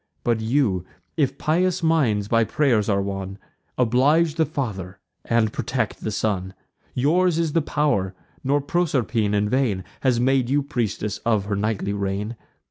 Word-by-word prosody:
But 115 -2 +1
you, 110 -6 +1 0.3
if 140 -4 0
pious 180 +3 +1
minds 130 -11 +2
by 115 +1 +3
pray'rs 115 -4 +1
are 100 -1 +2
won, 95 -1 -5 0.4
Oblige 140 +7 +3
the 160 0 +1
father, 100 - -4 0.3
and 115 -2 +1
protect 120 -5 -2
the - - -2
son. 95 -3 -2 0.4
Yours 165 +6 +2
is 165 -3 0
the 165 - +3
pow'r; 140 -11 0 0.3
nor 140 +2 +2
Proserpine 130 -10 0
in 105 0 +2
vain 110 -6 0 0.2
Has 125 -3 +2
made 130 0 +2
you 145 +1 +2
priestess 110 -6 -2
of 110 -4 +1
her 100 0 -1
nightly 100 0 -1
reign. 100 +3 -2
115 Hz, 150 wpm, -23 LUFS, 100-145 Hz, 0.4 s, by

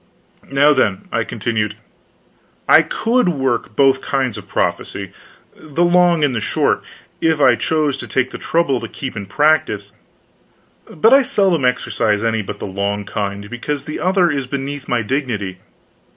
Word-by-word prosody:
"Now, 145 +2 +5
then," 105 -8 0
I - - 0
continued, 105 -3 -2 0.9
"I - - +7
could 235 -3 +1
work 130 - -1
both 135 0 +4
kinds 130 -5 -1
of - - -9
prophecy 95 -2 -2 0.4
the 155 +2 -2
long 175 -2 +4
and 140 -3 +2
the 110 - -1
short - - 0 0.4
if 160 -2 +2
I 135 -3 +6
chose 155 -4 0
to - - -7
take 130 -1 0
the - - -7
trouble 160 -6 +1
to - - -6
keep 130 -3 -7
in 100 -2 -6
practice; 105 -6 +1 1.0
but 225 +10 +3
I 275 - +7
seldom 190 - +1
exercise 110 -4 0
any 115 -1 0
but 100 - -7
the - - -6
long 100 +1 -3
kind, 100 -1 -4
because 130 +5 -4
the 155 - -6
other 185 -2 +2
is 140 -3 -3
beneath 140 +1 -5
my 120 -2 0
dignity. 105 -7 -3
135 Hz, 160 wpm, -18 LUFS, 105-155 Hz, 1.0 s, I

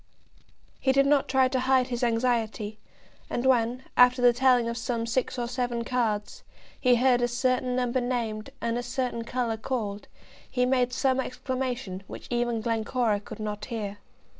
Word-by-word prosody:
He 265 - +2
did 275 +1 +4
not 280 -1 +3
try 265 -1 +4
to 260 0 -1
hide 260 0 +2
his 240 0 -2
anxiety, 225 -3 0 0.5
and 240 - -2
when, 250 0 +2
after 250 +1 +6
the 245 -1 +6
telling 250 -1 +3
of 235 - -2
some 235 -1 -2
six 245 +3 -1
or 240 -1 -2
seven 245 -1 -2
cards, 230 - -1 0.4
he 250 -2 +4
heard 245 0 +3
a 240 - +3
certain 250 +1 0
number 250 0 0
named, 230 -4 -2
and 235 +1 -1
a - - -2
certain 245 -1 -2
colour 235 -1 -2
called, 215 -4 -3 0.4
he 250 -1 +1
made 250 -1 +2
some 260 +1 +1
exclamation 255 -6 -3
which - - -9
even 240 -1 0
Glencora 225 -1 0
could 210 - -10
not 210 -1 -4
hear. 205 -4 -5
245 Hz, 165 wpm, -27 LUFS, 230-255 Hz, 0.5 s, after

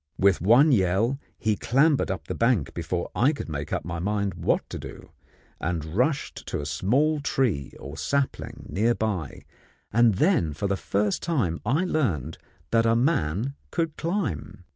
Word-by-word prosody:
With 95 -3 +3
one 120 - +6
yell, 110 +5 +2 0.2
he 110 -1 +1
clambered 140 +6 +2
up 85 -6 -4
the - - -2
bank 115 - +1
before 85 +1 -3
I 135 +6 +3
could 145 - -6
make 70 -2 -4
up - - -2
my 85 -1 -4
mind 100 +1 -1
what 85 - 0
to - - -5
do, - - -10 0.5
and 80 -2 -2
rushed 125 - -1
to - - -2
a 75 - -4
small 140 - +1
tree 120 - 0
or 70 +3 -8
sapling 135 - -2
near 115 +4 +1
by, 95 -10 -3 0.5
and 115 -2 +5
then 150 - +2
for 80 - -4
the 100 - +1
first 100 +2 -1
time 120 - -1
I 150 +10 +2
learned 90 - -1 0.3
that 115 0 +3
a 115 - +4
man 120 - +1 0.2
could 165 -3 -1
climb. 165 - -3
105 Hz, 165 wpm, -26 LUFS, 85-135 Hz, 0.5 s, one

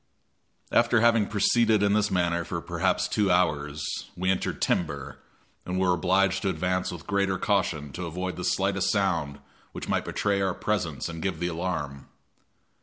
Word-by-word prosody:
After 120 -1 +4
having 115 -3 +4
proceeded 110 0 +3
in 100 0 +3
this 105 0 +2
manner 85 -2 +1
for - - -4
perhaps - - 0
two 105 -2 +1
hours, 75 -4 0
we 95 +1 +1
entered 95 - -2
timber, 70 -5 -1 0.4
and 90 +1 -2
were 95 -1 +3
obliged 95 +2 +2
to 100 - 0
advance 90 0 -1
with 85 -4 -8
greater 100 -2 +1
caution 85 -9 0
to 85 +4 -5
avoid 90 +3 -4
the 90 - -6
slightest 95 +1 +1
sound 85 -8 0 0.4
which - - -6
might - - 0
betray 100 -1 0
our 95 -2 0
presence 90 -9 -2
and 85 -1 -6
give 95 -4 -2
the 90 0 -1
alarm. 80 -5 -4
90 Hz, 165 wpm, -27 LUFS, 85-100 Hz, 0.4 s, After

